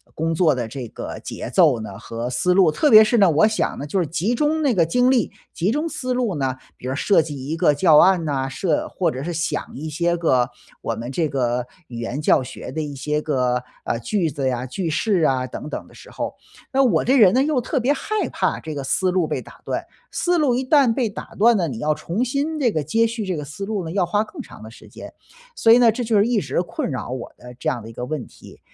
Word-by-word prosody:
工 165 +1 -1
作 160 -4 +3
的 120 -3 -3
这 125 -1 -6
个 - - -7
节 - - -6
奏 140 - +4
呢 100 -3 -8
和 115 +2 -5
思 180 +7 +1
路。 180 -5 +5
特 295 - +2
别 215 -1 +9
是 230 +2 +2
呢， 195 -4 +6
我 160 +7 +4
想 215 0 0
呢， 145 - -5
就 185 +6 -1
是 170 - 0
集 175 +9 -1
中 305 +4 +1
那 275 -5 +2
个 170 -5 +3
精 250 +9 +3
力， 240 -6 +1 0.2
集 185 +6 0
中 305 +5 -1
思 255 -3 -3
路 240 -8 -1
呢 135 -2 -1 0.2
比 125 - -8
如 130 - -2
设 195 +2 +3
计 145 -4 -6
一 160 +2 -2
个 150 - +4
教 150 +1 +5
案 185 -1 +5
呐， 135 -2 -1
设 155 +4 -1
或 175 -3 0
者 130 - -5
是 175 +1 -3
想 160 -2 -2
一 155 +4 -5
些 170 +3 0
个 130 -7 +2 0.3
我 115 - -2
们 120 +3 -6
这 160 +2 0
个 125 -2 -1 0.2
语 120 -1 -8
言 125 +5 -4
教 145 - +4
学 125 - -8
的 155 - -3
一 145 -2 -5
些 150 +3 -2
个， 125 -4 0 0.2
啊， 115 - -1
句 170 - -1
子 135 -1 -2
呀、 125 0 -1
句 170 +6 -3
式 185 +3 +1
啊， 130 -4 +1
等 150 - -7
等 - - -6
的 - - -19
时 - - -14
候。 - - -4 0.4
那 270 0 +3
我 185 -11 +3
这 265 +3 +3
人 200 -6 +7
呢， 260 +2 +4
又 290 -4 +1
特 270 +3 -1
别 265 +5 +2
害 430 +6 -2
怕 - - -1
这 155 -1 -6
个 140 -2 -4
思 185 +7 +1
路 180 -4 +1
被 - - -2
打 - - -15
断。 - - -3 0.3
思 350 -1 +1
路 270 -6 +2
一 260 +1 -1
旦 270 -5 +4
被 245 -2 0
打 200 - -9
断 230 +3 +5
了， 175 -4 +1
你 125 -7 -5
要 150 +5 +1
重 170 +10 -2
新 285 +5 -2
这 245 -5 +2
个 155 -5 -1
接 225 +10 +2
续 225 -2 -3
这 185 -2 -2
个 150 - -5
思 180 +7 -8
路 205 -5 -3
呢， 160 - -5
要 190 -2 +1
花 205 +5 +1
更 280 - -9
长 110 - -13
的 110 - -10
时 - - -15
间。 - - -11 0.4
所 225 - +4
以 235 - +8
呢， 235 -2 +6
这 245 +3 -3
就 225 -2 +2
是 205 - +4
一 235 -4 +1
直 - - -1
困 - - -4
扰 130 -3 -4
我 125 -2 -6
的 125 0 -12
这 125 - -2
样 120 -3 -3
的 115 - -9
一 115 - -11
个 125 - -5
问 145 -2 -4
题。 - - -16
165 Hz, 285 characters per minute, -22 LUFS, 135-225 Hz, 0.4 s, 别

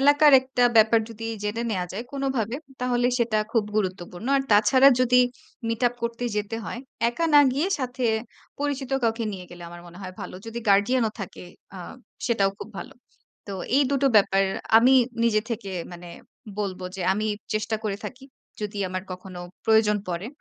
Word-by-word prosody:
এলাকার 290 +1 +6
একটা 260 -1 0
ব্যাপার 225 +1 +6
যদি 225 0 -7 0.2
জেনে 210 +3 -2
নেওয়া 180 -3 -1
যায় 220 +6 -5
কোনভাবে 265 -4 -1 0.2
তাহলে 245 -1 +1
সেটা 230 -2 +1
খুব 225 -3 +2
গুরুত্বপূর্ণ। 185 +1 -3
আর 270 - +1
তাছাড়া 255 +6 +6
যদি 250 0 +5 0.5
মিট 230 +1 -2
আপ 245 - -13
করতে 235 +1 -3
যেতে 210 +2 -2
হয়, 235 - -5 0.3
একা 330 +8 -2
না 290 - +10
গিয়ে 295 +8 0
সাথে 250 -1 -3 0.6
পরিচিত 280 -2 -2
কাউকে 230 0 0
নিয়ে 185 -2 -7
গেলে 175 0 -11
আমার 175 0 -10
মনে 175 +1 -13
হয় 185 -1 -7
ভালো। - - -7
যদি 225 +1 -5
গার্ডিয়ান 205 +6 +4
ও - - -7
থাকে 185 -1 -7 0.3
আ - - -7 0.5
সেটাও 200 -5 +2
খুব - - -8
ভালো। - - -8 0.5
তো 200 - -6 0.2
এই 285 - +5
২টো 275 0 +2
ব্যাপার 195 -1 +4 0.4
আমি 255 +3 +5 0.3
নিজে 215 -2 +3
থেকে 215 -4 -4 0.2
মানে 175 0 -10 0.5
বলব 195 -3 -3 0.2
যে, - - -6
আমি 210 +2 -1 0.3
চেষ্টা 215 +1 -1
করে 200 -2 -1
থাকি। 260 +1 -8 0.4
যদি 210 0 -4
আমার 185 0 -4
কখনো 185 0 -9 0.2
প্রয়োজন 220 -1 +4
পড়ে। 175 +3 -3
225 Hz, 175 wpm, -25 LUFS, 195-250 Hz, 0.6 s, না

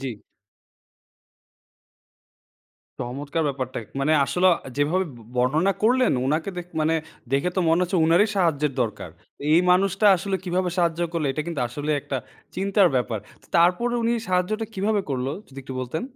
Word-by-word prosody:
জি। 135 - -3 2.9
চমৎকার 140 +6 -3
ব্যাপারটা। 130 -2 -4 0.2
মানে 145 +3 +2
আসলে 180 +6 +1
অ - - -4 0.2
যেভাবে 160 +6 +1
ব - - -13 0.2
বর্ণনা 150 +10 +2
করলেন 250 +3 +4
উনাকে 155 +7 0
দে 180 - -3 0.2
মানে 155 +1 +2 0.4
দেখে 140 +6 +2
তো - - +3
মনে 165 +2 +3
হচ্ছে 180 +1 0
উনারই 170 +7 +4
সাহায্যের 150 -6 +1
দরকার। 105 -6 -5 0.4
এই 165 - +6
মানুষটা 195 +3 +3
আসলে 195 +2 -2
কিভাবে 180 0 0
সাহায্য 170 -1 +1
করলো 165 -3 -1
এটা 155 - -2
কিন্তু 170 -5 -3
আসলে 145 +5 -4
একটা 135 - -4 0.4
চিন্তার 195 0 +3
ব্যাপার। 120 -3 0 0.2
তো - - -21
তারপরে 180 +8 +3
উনি 230 +1 +2 0.2
সাহায্যটা 185 +5 0
কিভাবে 205 +2 +1
করল? 130 -1 -1 0.2
যদি 135 - -11
একটু 130 0 -8
বলতেন। 130 +6 -3
170 Hz, 150 wpm, -24 LUFS, 140-185 Hz, 2.9 s, এই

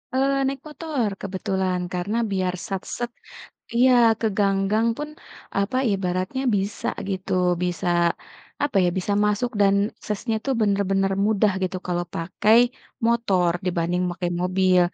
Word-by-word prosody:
Eee, 275 +1 +2
naik 275 0 -2
motor 300 -5 -2
kebetulan 190 -1 -1
karena 185 +5 -1
biar 185 -2 0
sat-set 220 +5 -4 0.7
iya 255 +2 +6 0.3
ke 225 - +1
gang-gang 200 +2 +2
pun, 295 0 -4 0.5
apa, 200 +6 0 0.2
ibaratnya 185 +6 -1
bisa 200 +2 -3 0.2
gitu 190 0 -3 0.3
bisa, 180 0 -2 0.8
apa 285 -6 0
ya, - - +3
bisa 190 +2 -1
masuk 210 +4 +1
dan 200 -1 +5 0.3
aksesnya 220 +2 -2
tuh 270 - 0
bener-bener 195 -2 +1
mudah 210 -1 +3
gitu 185 0 -1
kalau 175 -1 -1
pakai 190 +6 +2 0.5
motor 200 -7 +2
dibanding 175 0 0
pakai 175 0 -3
mobil, 185 0 +3
195 Hz, 130 wpm, -24 LUFS, 185-225 Hz, 0.8 s, iya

